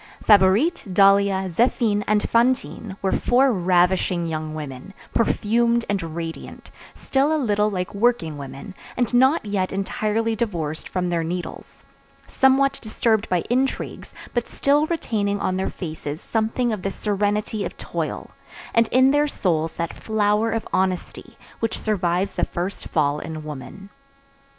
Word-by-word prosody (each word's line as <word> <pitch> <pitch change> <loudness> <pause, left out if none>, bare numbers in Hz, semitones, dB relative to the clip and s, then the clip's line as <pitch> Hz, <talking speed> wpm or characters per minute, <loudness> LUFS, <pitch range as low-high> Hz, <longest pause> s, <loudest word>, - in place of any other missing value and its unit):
Favourite, 205 - +4
Dahlia, 195 0 +4
Zéphine, 210 +2 +1
and 210 0 +2
Fantine 230 -4 0
were 190 - +1
four 255 +1 +3
ravishing 180 -1 +2
young 155 -1 -4
women, 150 +5 -8 0.2
perfumed 235 +1 +2
and 200 -2 -1
radiant, 165 -1 -7 0.2
still 275 +3 +1
a 315 - +2
little 210 -6 +1
like 180 -3 -3
working 200 -7 +1
women, 140 +6 -8 0.2
and 245 0 0
not 260 +3 +4
yet 195 -3 -1
entirely 215 +3 -1
divorced 170 -9 -3
from 180 -1 -1
their 170 -1 0
needles; 175 +2 -6 0.4
somewhat 270 +1 +3
disturbed 220 0 0
by 180 -2 +1
intrigues, 260 +2 -2 0.2
but 240 -2 -1
still 290 +2 +2
retaining 205 -11 -1
on 185 - -1
their 190 - -1
faces 155 -3 -6
something 225 +3 -1
of 210 - -4
the 195 - -1
serenity 205 +1 -1
of - - -6
toil, - - -4 0.4
and 230 -1 +4
in 260 +3 +4
their 290 +1 +3
souls 165 - -1
that 170 -1 -3
flower 215 0 +1
of 225 0 -2
honesty 185 -1 -2 0.2
which 225 - -1
survives 190 -2 0
the - - 0
first 180 +3 -5
fall 150 -2 +1
in 160 -1 -6
woman. 155 +7 -9
205 Hz, 140 wpm, -23 LUFS, 180-230 Hz, 0.4 s, Favourite